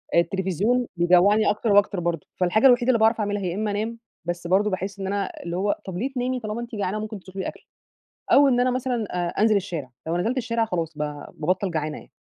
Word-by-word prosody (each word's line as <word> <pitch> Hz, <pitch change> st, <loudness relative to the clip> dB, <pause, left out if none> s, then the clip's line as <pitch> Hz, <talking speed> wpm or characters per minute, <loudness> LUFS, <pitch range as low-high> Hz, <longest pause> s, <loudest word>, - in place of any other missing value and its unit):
آآ -, -, +7 dB
التليفزيون 195 Hz, +7 st, 0 dB
بيجوعني 180 Hz, +5 st, +4 dB
أكتر 210 Hz, +1 st, 0 dB
وأكتر 200 Hz, -1 st, +4 dB
برضه. 170 Hz, -3 st, -2 dB
فالحاجة 185 Hz, +6 st, +3 dB
الوحيدة 245 Hz, -1 st, +4 dB
اللي 240 Hz, -3 st, +4 dB
باعرف 220 Hz, +1 st, +4 dB
أعملها 205 Hz, -1 st, -1 dB
هي 180 Hz, -3 st, -2 dB
إما 210 Hz, +1 st, -1 dB
أنام 220 Hz, +3 st, -3 dB, 0.3 s
بس 175 Hz, 0 st, -3 dB
برضه 195 Hz, +4 st, +3 dB
باحس 195 Hz, +1 st, -4 dB
إن 195 Hz, -, -3 dB
أنا 200 Hz, 0 st, -1 dB
اللي 170 Hz, 0 st, -4 dB
هو 200 Hz, +2 st, +1 dB
طَب 185 Hz, -2 st, -5 dB
ليه 255 Hz, +8 st, -2 dB
تنامي 255 Hz, +1 st, -1 dB
طالما 215 Hz, 0 st, -4 dB
أنتِ 235 Hz, -1 st, -7 dB
جعانة 205 Hz, 0 st, -2 dB
ممكن 215 Hz, -1 st, -5 dB
تطلبي 190 Hz, +1 st, -6 dB
أكل، -, -, -8 dB, 0.7 s
أو 280 Hz, 0 st, +7 dB
إن 245 Hz, -2 st, +3 dB
أنا 250 Hz, +1 st, +3 dB
مثلًا 250 Hz, -3 st, -1 dB
آآ 175 Hz, -1 st, -1 dB
أنزل 215 Hz, 0 st, +4 dB
الشارع. 170 Hz, -9 st, -3 dB, 0.2 s
لو 165 Hz, +1 st, 0 dB
نزلت 225 Hz, +9 st, 0 dB
الشارع 230 Hz, -2 st, 0 dB
خلاص 170 Hz, -7 st, -2 dB
ب -, -, -8 dB, 0.3 s
بابطل 185 Hz, +5 st, 0 dB
جعانة 155 Hz, -2 st, -2 dB
يعني. -, -, -15 dB
205 Hz, 220 wpm, -24 LUFS, 180-225 Hz, 0.7 s, آآ